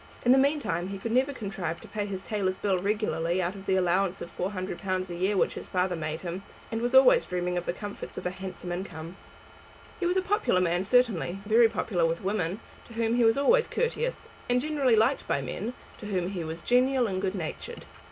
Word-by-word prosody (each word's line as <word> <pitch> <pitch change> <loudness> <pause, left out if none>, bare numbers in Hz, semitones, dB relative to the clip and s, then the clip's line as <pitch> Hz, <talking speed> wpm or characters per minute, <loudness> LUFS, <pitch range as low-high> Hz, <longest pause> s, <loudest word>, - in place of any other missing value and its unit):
In 245 - +6
the 260 - +7
meantime 280 - +1
he 195 0 -5
could 225 +4 -4
never 260 +4 +3
contrive 195 -8 -4
to - - -12
pay 205 0 -3
his 190 -1 -5
tailor's 195 -4 -1
bill 195 -3 +1
regularly 185 -4 0
out 180 0 0
of 195 -1 -11
the 190 - +3
allowance 185 +1 +1
of 170 - -8
£400 185 0 -3
a - - -4
year 190 +3 +1
which - - +2
his - - -8
father 180 -1 0
made 155 -1 -4
him, 180 +1 -4 0.3
and 225 0 -2
was 245 +2 +1
always 265 -1 +7
dreaming 180 0 -2
of 175 0 -3
the - - +2
comforts 205 +3 -7
of - - -6
a 180 - 0
handsome 185 -1 -7
income. 175 -2 -6 0.8
He 350 - +1
was 360 +2 +1
a 375 - +2
popular 405 - +2
man 175 +1 +1
certainly, 210 -7 +2
very 225 +2 +5
popular 180 -7 0
with 165 +2 -3
women, 190 0 -1 0.3
to 230 - -12
whom 230 0 0
he 240 0 +3
was 225 +1 +4
always 470 - +4
courteous, 485 +1 -2 0.2
and 245 0 +3
generally 280 -4 +2
liked 225 +6 +2
by - - +1
men, 205 - -4 0.2
to 210 - -7
whom 185 -3 -1
he 185 -4 -4
was 160 +1 -6
genial 255 +1 +3
and 190 -3 -2
good 195 0 -1
natured. 165 -5 -6
195 Hz, 220 wpm, -28 LUFS, 180-235 Hz, 0.8 s, the